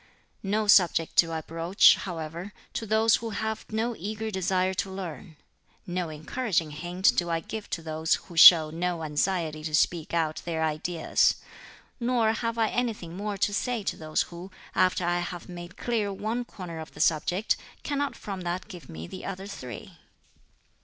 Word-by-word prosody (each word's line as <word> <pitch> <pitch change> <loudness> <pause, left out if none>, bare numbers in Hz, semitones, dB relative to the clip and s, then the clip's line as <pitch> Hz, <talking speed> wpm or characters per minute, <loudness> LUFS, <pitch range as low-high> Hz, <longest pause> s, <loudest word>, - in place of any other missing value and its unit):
"No 210 +2 0
subject 175 -5 +4
do 165 -1 +5
I 160 -1 -2
broach, 165 +4 +5
however, 170 +2 -6 0.2
to 225 - -4
those 220 +1 +4
who 230 - -5
have 220 +1 -4
no 225 +2 -1
eager 215 +4 -4
desire 190 -1 +1
to 190 - -2
learn; 185 -3 -7 0.5
no 175 -1 -2
encouraging 160 +1 -1
hint 175 +5 +1
do 175 -1 0
I 165 -1 +1
give 215 +6 -7
to 165 - -3
those 160 0 +1
who 175 - -11
show 160 -2 +9
no 170 0 -2
anxiety 155 0 -1
to 155 -1 -1
speak 165 0 +1
out 160 -2 0
their 165 -2 -2
ideas; 160 +2 +1 0.6
nor 235 -2 +2
have 230 0 -2
I 225 -1 +2
anything 215 -9 -2
more 205 +1 -3
to 205 +1 +1
say 240 0 -1
to - - -2
those 155 -1 -1
who, 175 +2 -8 0.2
after 185 -1 +2
I 175 0 +1
have 175 -1 -5
made 175 0 -9
clear 220 -4 -1
one 220 +5 -3
corner 175 -7 -8
of 160 - -9
the - - -11
subject, 175 +6 +2 0.3
cannot 285 -1 -1
from 195 -2 -6
that 175 +2 -3
give 180 -6 -11
me 80 +1 -7
the 185 - -9
other 195 0 -5
three." 185 - -9
180 Hz, 175 wpm, -27 LUFS, 165-210 Hz, 0.6 s, show